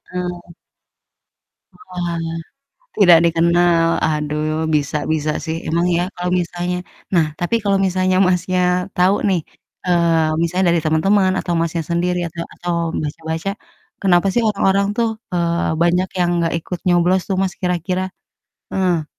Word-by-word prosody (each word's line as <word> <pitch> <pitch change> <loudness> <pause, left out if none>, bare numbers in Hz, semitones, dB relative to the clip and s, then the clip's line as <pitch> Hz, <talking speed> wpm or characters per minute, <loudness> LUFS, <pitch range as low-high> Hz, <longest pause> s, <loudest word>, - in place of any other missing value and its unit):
Heeh. 180 -1 -5 1.2
Oalah. 170 - -4 0.6
Tidak 175 -5 +7
dikenal, 170 0 +3 0.2
aduh 155 +1 -1
bisa 145 0 0 0.2
bisa 155 -1 -1
sih. 160 0 -2
Emang 170 +2 +1
ya 175 - +1
kalau 180 0 -3
misalnya 175 +1 -3 0.4
nah, 165 -3 +3
tapi 175 +6 0
kalau 200 -1 +2
misalnya, 185 0 +1
Masnya, 180 0 0 0.4
tahu 185 +3 +4
nih, 180 -3 +1 0.4
eee, 165 -3 +2
misalnya 180 +3 +1
dari 170 - +1
teman-teman, 185 +5 +3
atau 175 - -2
Masnya 165 0 -1
sendiri, 180 +1 0
atau 170 +1 -6
atau 175 0 -3 0.3
baca 150 +2 -5
baca, 160 +4 -2 0.5
kenapa 185 -1 +3
sih 240 - +2
orang-orang 200 -1 +2
tuh, 230 -1 +2 0.2
eee, 170 -1 0
banyak 180 +2 +2
yang 175 -1 +2
enggak 165 - 0
ikut 175 +1 -6
nyoblos 180 +1 +3
tuh, 190 - +1
Mas, 190 -1 -1
kira-kira? 180 +1 -1 0.7
Heeh. 180 -4 +1
175 Hz, 140 wpm, -19 LUFS, 165-185 Hz, 1.2 s, Tidak